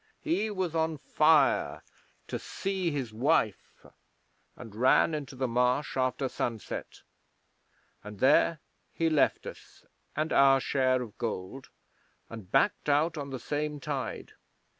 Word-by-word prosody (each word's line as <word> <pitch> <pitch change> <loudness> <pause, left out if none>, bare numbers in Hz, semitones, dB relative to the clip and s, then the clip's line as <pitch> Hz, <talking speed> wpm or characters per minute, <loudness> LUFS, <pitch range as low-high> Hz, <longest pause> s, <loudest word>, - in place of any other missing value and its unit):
He 310 -10 0
was 185 -5 -2
on 160 -1 0
fire - - +2 0.4
to - - -4
see 190 -2 -3
his 135 -7 -4
wife, 115 -3 0 0.7
and 115 -4 -11
ran 130 +7 +4
into 140 -3 -5
the 130 0 -1
Marsh 125 +4 0
after 130 +1 0
sunset, 115 -3 -5 1.0
and 105 -1 -10
there 145 +5 +4 0.3
he 165 -1 +1
left 150 -3 +2
us - - -12 0.3
and 155 +2 -1
our 135 -1 +6
share 130 -1 +1
of 110 -4 -11
gold, 115 +3 -5 0.6
and 110 -5 -10
backed 135 +2 +2
out 150 +4 +2
on 140 -2 -5
the 135 - -4
same 150 +3 -3
tide. 135 -6 -5
135 Hz, 130 wpm, -29 LUFS, 125-155 Hz, 1.0 s, our